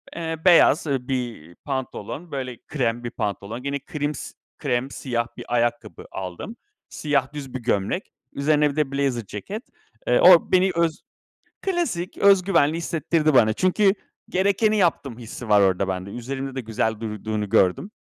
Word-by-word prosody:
eee, 165 -1 -3
beyaz, 165 -3 +6
ııı, 130 -3 -1
bir 120 - -4
pantolon, 135 - -5
böyle, 130 -3 -4
krem 120 -4 -1
bir 120 - -4
pantolon, 105 +4 -4
gene 140 0 -2
krims 150 -1 -4 0.2
krem, 130 -1 -1
siyah 120 -3 -2
bir 120 - -7
ayakkabı 120 0 -1
aldım. 95 - -6 0.3
Siyah 140 -2 -1
düz 135 -3 -7
bir 130 - -3
gömlek, 115 - -1 0.2
üzerine 150 +1 +2
bir - - -10
de 150 -3 0
blazer 135 -5 -1
ceket. 195 - -6 0.4
Eee, 125 - +4
o 175 -2 +7
beni 185 +1 +4
öz 170 -1 0 0.6
Klasik. 335 - -2
Öz 200 -2 +5
güvenli 165 -4 +2
hissettirdi 160 -2 0
bana 110 -4 +5
çünkü 190 - +3 0.4
gerekeni 200 +3 +2
yaptım 140 - 0
hissi 115 0 -8
var 105 -1 +6
orada 95 0 +2
bende. 95 +1 -3
Üzerimde 135 +3 -5
de 130 - -2
güzel 110 -1 -1
durduğunu 105 -1 -4
gördüm. 95 - +2
135 Hz, 155 wpm, -23 LUFS, 115-165 Hz, 0.6 s, o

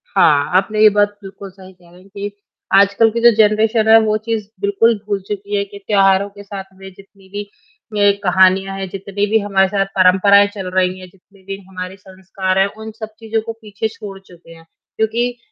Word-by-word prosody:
हाँ, 145 -2 +3
आपने 210 +3 -1
ये 215 - +8
बात 205 0 +2
बिल्कुल 195 0 -10
सही 190 0 -15
कह 175 -1 -23
रहे 175 +1 -18
हैं, 195 - -20
कि 200 +1 -6 0.4
आजकल 200 +3 +4
की 235 - -2
जो 235 0 +7
जनरेशन 220 +1 +2
है, 225 0 +8
वो 215 -1 0
चीज़ 215 -1 -4
बिल्कुल 205 +3 +2
भूल 200 -1 -1
चुकी 205 0 -4
है, 200 - 0
कि 200 0 -12
त्याेहारों 195 -1 +3
के 205 0 -13
साथ 195 -1 -7
में 190 0 -11
जितनी 195 0 -20
भी 205 0 -6 0.5
ये 205 0 +5
कहानियाँ 190 +1 +3
हैं, 195 0 -4
जितनी 200 +2 -3
भी 220 +1 +3
हमारे 195 -2 +1
साथ 195 0 -1
परंपराएँ 195 +2 +5
चल 190 -2 -5
रही 185 0 0
हैं, 185 - -11
जितने 195 +1 -25
भी 195 +1 -6
हमारे 185 0 -7
संस्कार 190 0 -5
हैं, 195 - +4
उन 220 0 -8
सब 220 -1 -6
चीज़ों 225 -1 -2
को 225 +1 -6
पीछे 210 0 -4
छोड़ 210 -3 -10
चुके 175 -3 -18
हैं। 165 0 -18 0.3
क्योंकि 235 +3 -1
200 Hz, 205 wpm, -17 LUFS, 190-215 Hz, 0.5 s, ये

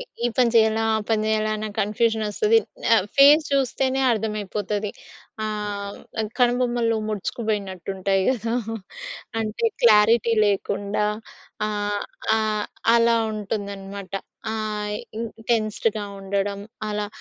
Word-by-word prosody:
ఈ - - -4 0.2
ఈ - - +5
పని 250 -3 +4
చేయాలా? 220 0 +4
ఆ - - +1
పని 220 -1 +2
చేయాలా? 215 0 +1
అన్న 215 0 -4
కన్ఫ్యూజనొస్తది. 220 - +2 0.6
ఫేస్ 285 +3 +8
చూస్తేనే 265 0 +1
అర్థమైపోతది. 210 -1 -2 0.5
ఆహ్, 205 -1 -4 0.4
కనుబొమ్మలు 240 -2 +2
ముడుచుకుపోయినట్టుంటాయి 195 -3 -2
గదా! 235 -2 0 0.9
అంటే, 220 - -1 0.2
క్లారిటీ 230 +1 +5
లేకుండా 200 +1 0 0.6
ఆహ్, 205 -1 -1 0.4
ఆహ్, 215 -1 0 0.3
అలా 235 0 +5 0.2
ఉంటుందన్నమాట. 200 -2 -5 0.4
ఆహ్, 210 -1 -2 0.2
ఈ - - -2 0.3
టెన్స్‌డ్‌గా 215 -1 +1 0.2
ఉండడం. 200 +1 -2 0.3
అలా 210 0 -2
215 Hz, 100 wpm, -24 LUFS, 205-230 Hz, 0.9 s, ఫేస్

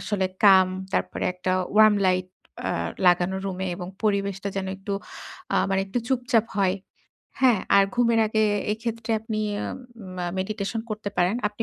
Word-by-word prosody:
আসলে 195 -3 -1 0.2
calm, 190 -2 +7 0.2
তারপরে - - -1
একটা 185 0 -2 0.2
warm 215 -1 +7
light 185 0 +1 0.3
অ্যা - - -1 0.3
লাগানো 180 +2 +3
রুমে 190 -1 -3
এবং 180 -1 -6 0.2
পরিবেশটা 200 -1 0
যেন 190 -1 -2
একটু 195 +1 -6 0.6
আ - - +3
মানে 195 0 +2
একটু 220 +6 -2
চুপচাপ 245 -4 +2
হয়। 190 -1 +2 0.7
হ্যাঁ, 240 -6 +5 0.2
আর 200 - +7
ঘুমের 235 -2 +3
আগে 220 0 +2 0.3
এক্ষেত্রে 230 +1 -4
আপনি 220 -1 -3 0.6
উম 185 0 -9
আ - - -2
meditation 215 +2 -3
করতে 210 -1 -4
পারেন। 180 +4 +3
আপনি 210 +2 -5
200 Hz, 155 wpm, -25 LUFS, 190-220 Hz, 0.7 s, calm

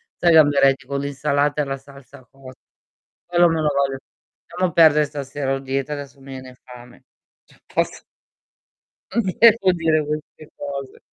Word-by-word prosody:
Sai 175 - +2
i - - +5
gamberetti 140 -3 +4
con 140 0 -3
l'insalata 140 +1 -1
e - - -1
la 135 0 -4
salsa 140 -1 -16
cot 135 -1 -14 0.7
quello 175 0 +4
me 165 -1 0
lo 150 - +1
voglio 140 -1 0 0.5
lasciamo 180 0 -2
perdere 155 -2 +5
stasera 140 -1 -4
ho 135 - -4
dieta 135 +1 -3
adesso 140 -2 -9
mi 135 0 -12
viene 130 -1 -10
fame. 125 -1 -15 0.4
Cioè - - -25
poss - - -2 1.1
Non 235 - +2 0.2
devo 225 -4 +6
dire 160 -3 0
queste 150 0 -7
cose. 140 -2 -7
140 Hz, 155 wpm, -21 LUFS, 135-155 Hz, 1.1 s, devo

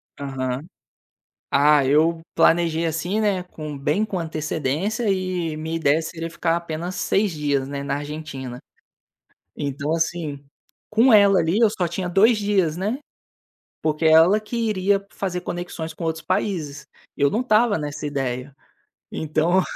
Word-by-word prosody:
Aham. 135 -1 -3 0.9
Ah, 145 0 +5
eu 160 +4 +3
planejei 165 -1 +3
assim, 170 +6 -1
né, 200 -4 +1
com 155 -4 -8
bem 150 +9 +1
com 205 -3 -3
antecedência 160 - -2
e 185 -4 -1
minha 160 +1 -3
ideia 160 0 +2
seria 165 +1 -5
ficar 165 0 0
apenas 170 +1 -4
6 200 -1 +1
dias, 145 -3 -1
né, 140 0 -5
na 140 0 -2
Argentina. 145 -4 -6 1.0
Então, 140 +1 -3
assim, 160 -4 -2 0.5
com 230 +4 +5
ela 200 -2 +6
ali 165 +5 +1
eu 230 -1 +5
só 185 -5 -1
tinha 180 +2 -3
2 215 +6 +4
dias, 200 -6 +1
né, 210 +8 -2 0.8
porque 155 +1 0
ela 160 +6 +6
que 215 +2 -6
iria 200 -3 +1
fazer 180 -2 -3
conexões 175 -2 -5
com 165 - -7
outros 160 0 -3
países, 155 -7 -2 0.3
eu 140 0 +3
não 220 - 0
estava 225 -4 +3
nessa 150 0 -5
ideia. 135 -1 -3 0.6
Então, 160 +4 +1
165 Hz, 145 wpm, -23 LUFS, 150-190 Hz, 1.0 s, ela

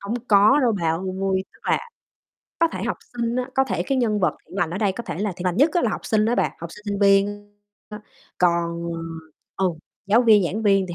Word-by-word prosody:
Hông 200 +3 -4
có 210 +6 +6
đâu 245 -4 +3
bà 165 - 0
ơi, 190 +2 -1
tức - - -21
là - - +3 0.8
có 335 0 +4
thể - - -5
học - - -2 0.2
sinh 235 0 -2
á, 255 0 -2
có 265 - +3
thể - - -2
cái 270 -1 -1
nhân 215 -4 +1
vật 180 - +1
thiện 190 - -11
lành 175 -5 0
ở 185 - -4
đây, 205 -3 +1
có 235 - -6
thể 170 - -6
là 205 -1 -1
thiện 180 - -7
lành 180 0 0
nhất 290 +6 +4
á 350 - +2
là 225 - +1
học - - -3
sinh 215 -1 +2
á 235 - +2
bà, - - +1
học 170 0 -7
sinh, 210 - -13
sinh 205 -1 -3
viên 205 +1 +2 0.4
á. 210 0 -8 0.4
Còn, 170 -1 +1 0.7
ờ 190 - +1
ừ, 180 - 0 0.3
giáo 225 +5 +4
viên, 215 -5 +5
giảng 210 +6 -2
viên 195 -2 +3
thì 175 - -5
205 Hz, 250 wpm, -23 LUFS, 185-230 Hz, 0.8 s, có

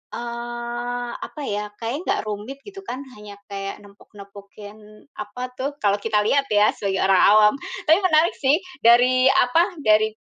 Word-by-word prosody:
eee, 240 0 -5
apa 300 - -8
ya, 210 0 -2
kayaknya 240 +8 -4
nggak - - 0
rumit 215 +7 -6
gitu 395 -1 -10
kan, 265 +3 -5 0.2
hanya 205 -1 -11 0.2
kayak 195 0 -5
nempok-nempokin 205 +2 -15
apa 250 +4 -7
tuh, 280 +2 -3
kalau 200 0 +2
kita 215 0 0
lihat 275 +5 +1
ya 210 0 +4
sebagai 190 -1 -2
orang 190 -1 +4 0.2
awam. 210 0 +6 0.3
Tapi 320 +5 +5
menarik 340 -3 +2
sih, 285 +4 +3 0.2
dari 250 +2 +5
apa, 330 +9 +2
dari 215 0 +3
235 Hz, 150 wpm, -22 LUFS, 205-255 Hz, 0.3 s, awam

